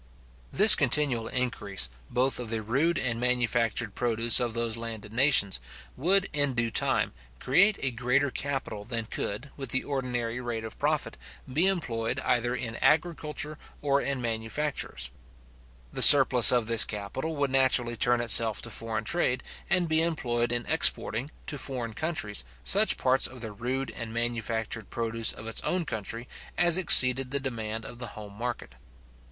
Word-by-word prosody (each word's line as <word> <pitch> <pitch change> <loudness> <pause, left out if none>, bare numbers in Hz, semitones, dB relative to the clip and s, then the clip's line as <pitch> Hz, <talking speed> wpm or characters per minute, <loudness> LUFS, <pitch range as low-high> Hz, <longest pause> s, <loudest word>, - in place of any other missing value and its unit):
This 210 +3 +10
continual 135 -4 +2
increase, 105 - -2 0.2
both 125 +2 0
of 120 -3 -7
the 110 -1 -4
rude 140 +10 0
and 115 -3 -1
manufactured 120 -3 -1
produce 115 0 +3
of 120 -2 -3
those 115 -1 -2
landed 110 -2 -8
nations, 120 - +3 0.4
would, 190 +8 +2
in 145 -3 +1
due 115 -1 -1
time, - - 0 0.3
create 195 +11 +2
a 135 - 0
greater 125 +4 -1
capital 135 -8 -5
than 115 0 -4
could, 110 +5 -6
with 135 -3 -7
the 130 - 0
ordinary 125 -4 -4
rate 115 -2 -5
of 110 - -11
profit, - - -2 0.4
be 165 +7 +2
employed 125 -10 -2
either 120 0 -1
in 115 -2 -6
agriculture 155 -1 -1 0.2
or 140 -1 +1
in 140 -1 -3
manufactures. 110 - -4 0.8
The - - -3
surplus 130 -4 +9
of 120 -3 +1
this 115 0 +5
capital 110 +10 -6
would 140 -2 -2
naturally 130 -3 +1
turn 120 +1 +1
itself 115 -2 +4
to 115 - -6
foreign 115 0 -4
trade 150 -7 0 0.3
and 180 -1 +1
be 160 0 +2
employed 120 -8 -1
in 120 0 -1
exporting, 125 +6 +1 0.2
to 145 - -4
foreign 120 -4 -3
countries, 110 - -4 0.2
such - - +4
parts 130 +1 +1
of 130 -1 -13
the 110 -2 -7
rude 125 +5 -5
and 115 -2 -8
manufactured 115 -2 -4
produce 115 -1 -2
of 110 - -12
its 115 - -1
own 180 -2 -2
country, 115 0 -7 0.3
as 175 -1 +4
exceeded 130 -6 +5
the 140 +1 -2
demand 110 -4 -6
of 120 - -10
the 120 - -5
home 105 -1 -10
market. 120 - -6
120 Hz, 160 wpm, -26 LUFS, 115-140 Hz, 0.8 s, This